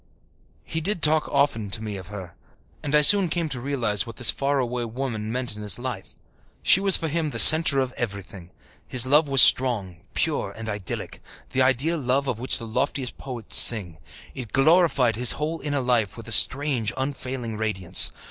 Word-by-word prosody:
He 160 - -6
did 180 -1 -3
talk 155 0 +2
often 115 -7 -2
to 110 +3 -2
me 105 -2 -7
of 95 -2 -11
her, 95 -4 -11 0.5
and 150 0 -3
I 150 - +3
soon 195 +3 +5
came 170 0 -3
to 125 -4 -7
realize 120 -8 -3
what 115 - -12
this 120 - +4
far 140 +1 -3
away 125 -2 -4
woman 115 -2 -7
meant 125 -2 -3
in 105 - -11
his 105 -1 +1
life. 120 -6 -9 0.5
She - - +4
was 195 -1 +4
for 165 - -5
him 160 0 -4
the - - -7
centre 155 -3 +8
of 130 -1 -4
everything. 100 -5 -9 0.4
His 130 -1 +2
love 150 +4 +1
was 135 -2 +5
strong, 105 -9 +2 0.2
pure, - - -3
and 110 0 -8
idyllic 105 -4 -7 0.3
the 130 - -1
ideal 135 +6 -1
love 135 +1 -2
of 125 -4 -5
which 130 +2 -1
the 115 - -9
loftiest 125 +3 -5
poets 120 -5 -2
sing. 90 -8 +4 0.3
It 125 -5 -10
glorified 135 - +1
his 125 0 +5
whole 155 +2 -6
inner 145 -2 -4
life 120 -5 -2
with - - -12
a - - -9
strange, 130 -5 +3
unfailing 130 -4 -6
radiance. 95 -5 +1
125 Hz, 190 wpm, -22 LUFS, 110-145 Hz, 0.5 s, centre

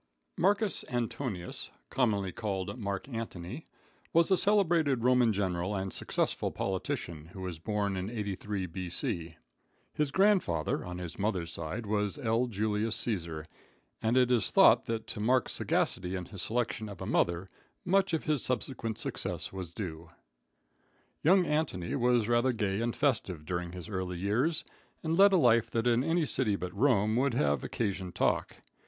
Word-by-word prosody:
Marcus 200 +2 +2
Antonius, 120 -6 -2 0.2
commonly 105 -7 +1
called 95 0 -3
Mark 100 -1 -3
Antony, 115 - -6 0.5
was 170 +2 +4
a - - +7
celebrated 170 - +3
Roman 125 -2 +4
general 95 -1 -1
and 95 -1 -3
successful - - 0
politician, 85 -4 -3
who 95 - -8
was 90 -4 -5
born 100 +1 -1
in 95 +2 -3
83 105 -3 -3
B.C. 85 -1 -3 0.6
His 150 -1 0
grandfather, 190 - +2
on 90 0 -6
his 90 0 -7
mother's 95 -5 -1
side, 85 +8 -4
was 105 -1 0
L. 120 -2 +1
Julius 110 0 0
Caesar, 85 -8 -1 0.6
and 115 +3 +2
it 125 -1 +4
is 115 -6 +3
thought - - +6
that 115 -1 -3
to - - -5
Mark's 125 +4 +2
sagacity 90 +1 +1
in 90 -1 -4
his 100 -1 -8
selection 115 -1 -2
of 100 -4 -9
a - - -5
mother, 85 +2 0 0.3
much 195 +1 +3
of 160 - -3
his 150 -5 +1
subsequent 120 -3 -2
success - - -4
was 95 -3 -5
due. 85 -3 -6 1.1
Young 180 +3 +5
Antony 150 - -1
was 120 -3 +2
rather 120 +2 +3
gay 105 -2 -1
and 120 0 -1
festive 95 - 0
during 90 +1 -3
his 90 0 -8
early 95 -3 -3
years, 120 - +1 0.4
and 160 0 0
led 200 +2 +7
a 190 - +5
life 115 -6 +4
that 115 0 -1
in 120 +1 +3
any 165 +1 +1
city 125 -7 +1
but 90 -2 -5
Rome 110 -3 +3
would 130 -1 +1
have 70 -8 +1
occasioned 95 -5 -3
talk. - - 0
110 Hz, 160 wpm, -30 LUFS, 95-125 Hz, 1.1 s, a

